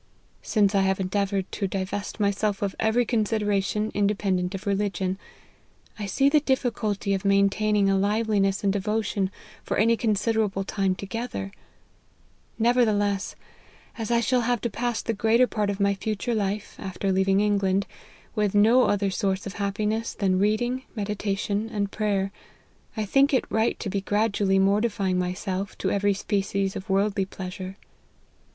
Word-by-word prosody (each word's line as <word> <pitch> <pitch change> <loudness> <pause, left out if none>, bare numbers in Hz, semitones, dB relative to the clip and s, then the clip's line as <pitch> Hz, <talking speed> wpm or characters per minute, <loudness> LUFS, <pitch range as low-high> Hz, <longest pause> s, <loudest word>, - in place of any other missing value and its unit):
" - - -38
Since 205 -2 +2
I 195 - +3
have 190 0 +1
endeavoured 195 0 -1
to 200 - -2
divest 195 +3 -4
myself 200 0 0
of 195 -1 -1
every 225 +2 +2
consideration 210 -2 0
independent 195 -2 0
of 195 - -7
religion, 195 -2 -1 0.8
I 205 - -3
see 275 +7 +2
the 300 +2 +5
difficulty 230 -8 -1
of 195 0 -1
maintaining 200 +1 +3
a 195 - +3
liveliness 200 -1 +1
in 200 - +3
devotion 205 -1 -1 0.3
for - - -2
any 230 +3 +4
considerable 215 -2 0
time 195 -1 0
together; 200 0 -5 1.1
nevertheless, 215 -4 +2 0.6
as 225 -2 -4
I 235 -1 +3
shall 250 +2 +2
have 240 0 +1
to 235 - -2
pass 240 +1 -2
the 230 - -1
greater 225 +4 +3
part 210 -4 -1
of 200 0 -3
my 200 0 +3
future 215 +4 -2
life, 205 -1 -2
after 195 0 -2
leaving 190 +1 +3
England, 200 -2 +2 0.5
with 210 -2 0
no 230 +5 +6
other 200 -1 +1
source 190 0 -1
of 200 - -5
happiness 210 +3 -1
than 190 -3 +1
reading, 240 +5 +1
meditation, 205 0 -2
and 200 -2 -2
prayer, 200 -2 0 0.7
I 215 - 0
think 275 +7 +3
it - - +1
right 220 +1 +1
to - - -4
be 200 - -1
gradually 205 -1 +1
mortifying 195 -1 +2
myself 185 +2 -3
to - - -1
every 200 0 +2
species 195 -1 -1
of 190 - -7
worldly 195 0 +1
pleasure." 185 0 -7
205 Hz, 150 wpm, -25 LUFS, 195-220 Hz, 1.1 s, no